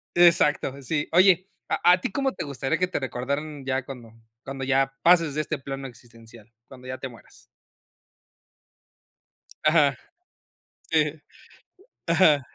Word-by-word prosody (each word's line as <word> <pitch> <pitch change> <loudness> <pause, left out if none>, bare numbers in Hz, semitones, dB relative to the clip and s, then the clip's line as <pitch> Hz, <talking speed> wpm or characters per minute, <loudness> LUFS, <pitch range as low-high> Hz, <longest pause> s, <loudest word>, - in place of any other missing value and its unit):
exacto, 150 -5 +3
sí. 145 +2 -2
Oye, 185 +1 +4 0.2
¿a - - 0
a 180 - +2
ti - - -3
cómo 270 +3 -1
te - - -5
gustaría 135 -1 -2
que 185 - +1
te 180 - -3
recordaran 140 +3 -4
ya 130 0 -1
cuando 120 -5 -10 0.3
cuando 135 0 -6
ya 135 0 +1
pases 165 -4 +4
de 155 - +1
este 155 - -3
plano 135 0 -6
existencial, 115 -2 -16 0.2
cuándo 130 -1 -14
ya 130 0 -6
te 130 - -5
mueras? 115 -3 -17 2.2
Ajá. 150 -3 +4 1.0
Sí. 150 -2 +2 0.9
Ajá. 165 -4 +4
140 Hz, 135 wpm, -25 LUFS, 130-165 Hz, 2.2 s, Oye